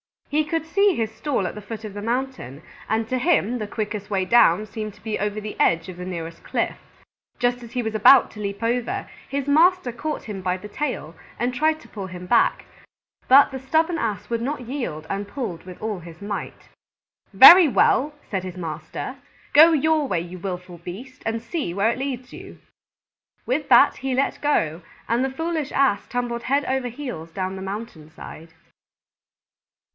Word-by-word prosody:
He 305 +1 +1
could 320 +1 -2
see 395 +3 +3
his 220 -1 -2
stall 220 -2 -2
at - - -3
the 210 - -8
foot 220 +1 -8
of 210 -2 -7
the 205 - -6
mountain, 235 - -3 0.3
and 220 +1 0
to 255 +2 -1
him 250 - +1
the 215 - -4
quickest 210 -1 -4
way 195 -2 0
down 210 -3 +4
seemed 215 -1 -6
to - - -22
be 220 -1 -3
over 210 +1 -2
the 210 0 -7
edge 165 +1 +2
of 180 - -9
the 180 - -6
nearest 165 -2 -6
cliff. - - -2 0.6
Just 245 0 0
as 235 -1 -11
he 245 - -1
was 220 -1 -3
about 225 +5 +6
to 210 - -12
leap 200 +1 -4
over, 235 +1 -1 0.2
his 275 -1 -2
master 325 -1 +4
caught 300 +6 -4
him 205 -3 -6
by 180 0 -1
the 210 +3 -10
tail 210 - -4 0.2
and 245 +2 -1
tried 310 +4 +1
to - - -15
pull 195 -3 -6
him 180 -1 -8
back, 230 +6 +2 0.6
but 275 +2 +7
the 265 - -5
stubborn 320 +6 +1
Ass 210 -5 -3
would 230 -1 -1
not 270 +2 -3
yield 240 - -5
and 200 +1 -3
pulled 200 -8 -5
with 185 -1 -10
all 215 -3 -3
his 170 +1 -12
might. 200 0 -6 0.6
"Very 355 -1 +10
well," 290 +2 +2
said 190 -3 -3
his 185 -1 -7
master, 160 - -6 0.4
"go 320 +3 +8
your 310 0 +2
way, 180 -8 0
you 175 +1 -8
willful 180 -1 -6
beast, 210 +10 -9
and 225 0 -2
see 260 - -3
where 205 +3 +2
it 240 - -5
leads 260 -2 -5
you." - - -11 0.9
With 275 +4 -1
that 240 - +6
he 265 -1 -2
let 270 +2 0
go, 165 - 0 0.3
and 235 +3 +2
the 265 - 0
foolish 315 +1 -3
Ass 265 -7 +2
tumbled 240 -1 -3
head 280 +3 +1
over 265 -1 -1
heels 240 - -7
down 190 -1 -3
the 190 - -7
mountain 195 -5 -7
side. 160 +1 -11
230 Hz, 190 wpm, -23 LUFS, 190-270 Hz, 0.9 s, Very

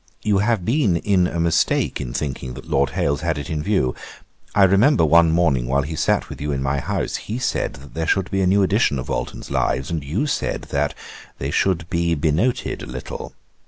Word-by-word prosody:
You 105 -2 +2
have 105 -3 +1
been 115 - +2
in 90 0 +2
a 85 - -4
mistake 85 -3 +1
in 65 -3 -5
thinking 65 -2 -4
that 65 - -10
Lord 70 0 +2
Hailes 70 0 +1
had 80 -3 -1
it 70 0 -5
in 75 -1 -1
view. 75 -9 +1 0.6
I 100 - +6
remember 100 - +5
one 85 +1 +5
morning, 80 -7 +2
while 70 +2 +1
he 80 +3 -5
sat - - +1
with - - -9
you 75 0 -2
in 70 -1 -2
my 70 +1 0
house, - - -2
he 110 - -5
said, 130 - -1
that 70 +1 -13
there 80 0 -2
should 95 +1 +1
be 95 -1 +1
a 95 - +2
new 100 +2 +4
edition 95 - +2
of 65 - -5
Walton's - - -4
Lives; 65 +3 0
and 80 -3 -2
you 85 - -1
said 145 - -2
that - - 0 0.4
"they 70 +2 -3
should 85 -2 +1
be 85 -1 +1
benoted 80 - 0
a - - -7
little." 65 0 -7
85 Hz, 215 wpm, -21 LUFS, 70-95 Hz, 0.6 s, I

